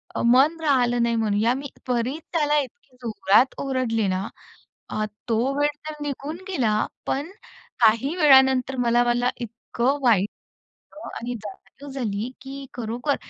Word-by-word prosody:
अ, - - -1
मन 270 +7 +5
राहिलं 245 -5 +2
नाही 235 0 +1
म्हणू 215 -3 +1
या. 235 +2 +3
मी 275 +2 -5 0.2
त्वरित 250 +5 -1
त्याला 300 -2 +2
इतकी 275 - -12
जोरात 225 +1 +3
ओरडले 250 -6 0
ना 185 +1 -1 0.6
अ, 215 - -1 0.2
तो 225 - +2 0.2
वेळ 290 0 +3 0.2
तर - - -5
निघून 290 +2 -4
गेला. 235 - +1 0.2
पण 290 +6 -2 0.5
काही 230 +7 +4
वेळानंतर 265 -4 +5
मला-मला 240 0 +2
इतकं 235 +3 -1
वाईट 210 -5 +4 0.7
वाटलं 310 - -9
आणि 240 +2 -4
जाणीव 210 +7 -11
झाली, 230 -4 -3
की 275 +1 -8
खरोखर 245 +4 -2
250 Hz, 140 wpm, -24 LUFS, 230-275 Hz, 0.7 s, मन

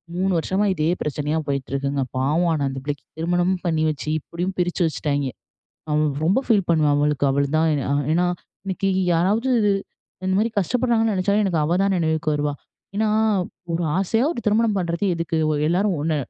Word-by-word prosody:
3 190 +2 +1
வருஷமா 190 +5 0
இதே 155 -2 0
பிரச்சனையா 150 +1 -1
போயிட்டுருக்குங்க. 140 0 -1
பாவம் 155 +7 +1
ஆனா 150 -3 -1
அந்த 135 - -5
பிள்ளைக்கு 145 -1 -4
திருமணமும் 175 +2 0
பண்ணி 160 -2 +1
வச்சு 150 0 -5
இப்டியும் 175 +5 -4
பிரிச்சு 175 +1 0
வச்சுட்டாய்ங்க. 145 -3 -1 0.6
அவ 150 - +1 0.3
ரொம்ப 190 +9 +3
ஃபீல் 205 -6 +3
பண்ணுவா 155 -3 +3
அவளுக்கு 145 -1 +1
அவுளதான். 145 +4 +1 0.4
ஏன்னா, 175 +2 +2 0.4
இன்னைக்கி 195 0 -1 0.2
யாராவது 205 +10 +1 0.8
இந்த 185 - +1
மாரி 225 +3 +2
கஷ்டப்படுறாங்கன்னு 230 +1 +1
நெனைச்சாலும், 200 +2 +1
எனக்கு 170 -5 +1
அவ 160 +3 +1
தான் 195 -1 +2
நினைவுக்கு 160 -1 0
வருவா. 145 0 -1 0.4
ஏன்னா, 220 +1 +1 0.7
ஒரு 170 +1 0
ஆசையா 225 +6 +1
ஒரு - - -5
திருமணம் 215 0 +2
பண்றது 170 +1 -1
எதுக்கு 165 0 -2 0.3
எல்லாரும் 185 +3 +1
ஒன்னு 155 +1 0
170 Hz, 155 wpm, -22 LUFS, 150-195 Hz, 0.8 s, ரொம்ப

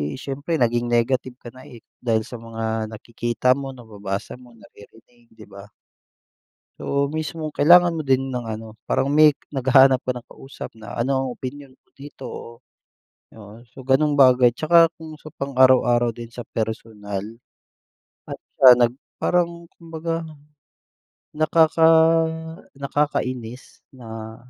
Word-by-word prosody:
siyempre 140 +4 -4
naging 120 -3 0
negative 125 +2 0
ka 120 -2 -12
na, 130 +3 -15
eh, 120 -6 -14 0.2
dahil 110 -2 0
sa 120 +2 -10
mga 110 -1 -4
nakikita 120 +3 -2
mo, 135 0 -2
nababasa 105 -2 -7
mo, 120 -2 -18
naririnig, 115 +2 -20
di 110 - -14
ba? 100 -1 -13 1.2
Oo, 140 0 0
mismo 155 +1 -5
kailangan 175 +3 +5
mo 160 - -3
din 135 -1 +1
ng 125 - -3
ano, 110 -1 -7
parang - - 0
may 150 +1 +6 0.2
naghahanap 130 -1 +4
ka 130 - -1
ng 125 -1 -9
kausap 135 -3 -11
na 110 -2 -11
ano, 130 +1 -1
opinyon 135 +2 -8
mo 130 - -29
dito 140 -1 -11
o, - - -8 0.9
oo, 110 +1 -14
so 120 - -17
gano'ng 135 +3 +2
bagay 125 -2 +6
tsaka 165 +5 +4
kung 160 -1 -10
sa 155 0 -13
pang 140 -1 -5
araw-araw 120 -2 +4
din 115 +1 -9
sa 120 +1 -9
personal 105 -3 -5 1.1
at - - -6 0.2
siya 125 -2 +9
nag 120 -1 +2 0.2
parang 170 -1 -1 0.2
kumbaga, 165 0 -4 1.1
nakaka 160 +1 +3 0.9
nakakainis 130 -4 -3 0.2
na 110 -2 -9
130 Hz, 135 wpm, -22 LUFS, 115-145 Hz, 1.2 s, siya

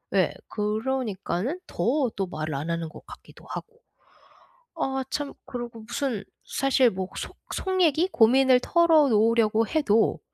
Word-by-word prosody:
예, - - +3
그러니까는 220 - -2
더 250 - 0
또 195 - -1
말을 155 -3 -4
안 145 +4 -4
하는 165 -1 -2
것 - - -14
같기도 - - -14
하고. 465 0 -7 1.0
아 270 -4 -1
참 290 0 -3
그러고 240 -2 -7
무슨 235 -1 -3 0.2
사실 270 -2 +3
뭐 190 -3 -4
속 - - -6 0.2
속 375 -1 -1
얘기 330 +1 +3
고민을 255 +2 +5
털어놓으려고 230 -10 +3
해도 230 -9 +2
240 Hz, 255 characters per minute, -26 LUFS, 210-280 Hz, 1.0 s, 고민을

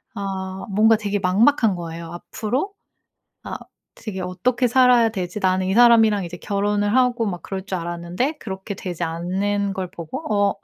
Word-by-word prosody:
아 190 -1 -4
뭔가 220 +3 +5
되게 205 -1 -2
막막한 210 +3 +3
거예요. 170 -1 -6
앞으로 245 - -3 0.7
아 - - -5 0.4
되게 190 -4 -6
'어떻게 240 +8 0
살아야 245 -2 +5
되지?' 185 -3 -4
나는 185 -1 +1
이 - - +1
사람이랑 225 -4 +5
이제 175 +1 -7
결혼을 205 +2 0
하고 250 -2 +3
막 180 -4 -4
그럴 190 -1 -5
줄 190 -2 -3
알았는데 175 - -2
그렇게 195 -3 -6
되지 180 -3 -4
않는 195 +5 -1
걸 185 -2 -4
보고 180 - -7 0.3
어 - - -4
200 Hz, 325 characters per minute, -22 LUFS, 185-225 Hz, 0.7 s, 뭔가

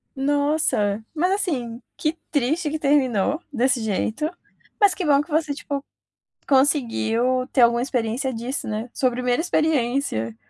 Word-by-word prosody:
Nossa, 280 -7 +1
mas 355 +4 +1
assim, 260 - -2
que 310 0 -1 0.2
triste 300 +3 0
que 310 - -2
terminou 280 - +1
desse 250 -2 +1
jeito, 220 +7 -1 0.5
mas 405 -3 +5
que 365 - -4
bom 285 -2 +4
que 305 - -11
você 310 -1 0
tipo, 280 -1 -5 0.7
conseguiu 255 -3 +2
ter 260 - +2
alguma 235 0 +5
experiência 250 0 -1
disso, 240 +4 -4
né, 220 +3 -4
sua 255 -2 +1
primeira 250 +1 0
experiência. 270 - 0
265 Hz, 135 wpm, -23 LUFS, 235-300 Hz, 0.7 s, mas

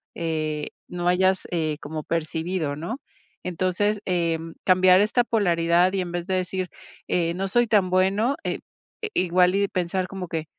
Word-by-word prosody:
Eh, 155 -2 -2 0.2
no 175 0 -3
hayas, 185 +1 +3
eh, 155 -3 -1
como 155 +1 -5
percibido, 160 -1 -2
¿no? 170 - -4 0.5
Entonces, 185 +4 0
em, 165 -2 -1
cambiar 185 0 +6
esta 230 +4 +3
polaridad, 175 -4 +2
y 195 - 0
en 175 -1 -5
vez 175 -1 -3
de 190 - -2
decir: 185 0 -1 0.4
"Eh, 170 -1 +1
no 195 +1 -2
soy 240 +4 +2
tan 205 -4 +3
bueno", 195 +8 +2
eh, - - -2 0.4
i 440 - -3 0.2
igual 180 +1 +4
y 200 0 +2
pensar, 185 0 -1
como 190 -2 -6
que: 160 -1 -3
180 Hz, 165 wpm, -24 LUFS, 165-190 Hz, 0.5 s, cambiar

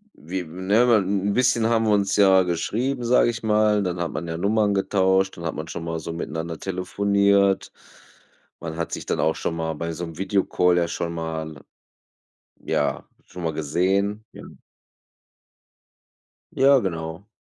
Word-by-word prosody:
Wi 90 +4 -5
ne, 95 +6 -1
mal 115 -3 +5
'n 95 0 -1
'n 100 - +1
bisschen 125 -2 +2
haben 115 -1 +2
wir 110 - +2
uns 100 -1 +1
ja 95 -2 +5
geschrieben, 115 +10 -2
sage 120 0 +4
ich 115 -1 -5
mal, 105 -1 +3
dann 90 -2 -3
hat 85 -3 -2
man 80 +4 -5
ja 80 0 -4
Nummern 105 +2 +1
getauscht, 95 -1 +1
dann 85 - -8
hat 80 - -3
man 80 +1 -6
schon 80 - -6
mal 80 -1 -3
so 85 +1 -6
miteinander 80 0 -5
telefoniert. 100 +1 +1 0.9
Man 80 -1 -6
hat 85 - -3
sich - - -5
dann - - -2
auch 80 - +2
schon 80 - -3
mal 80 0 -2
bei 85 +2 -4
so'm 80 -1 -6
Video-Call 90 -2 +1
ja 85 - +1
schon 85 0 -4
mal, 80 -2 -5 1.0
ja - - -1 0.2
schon 90 -1 -9
mal 80 -1 -1
gesehen, 95 +8 0
ja. - - -11 2.1
Ja, 135 0 +5
genau. 80 0 -5
95 Hz, 165 wpm, -23 LUFS, 85-100 Hz, 2.1 s, mal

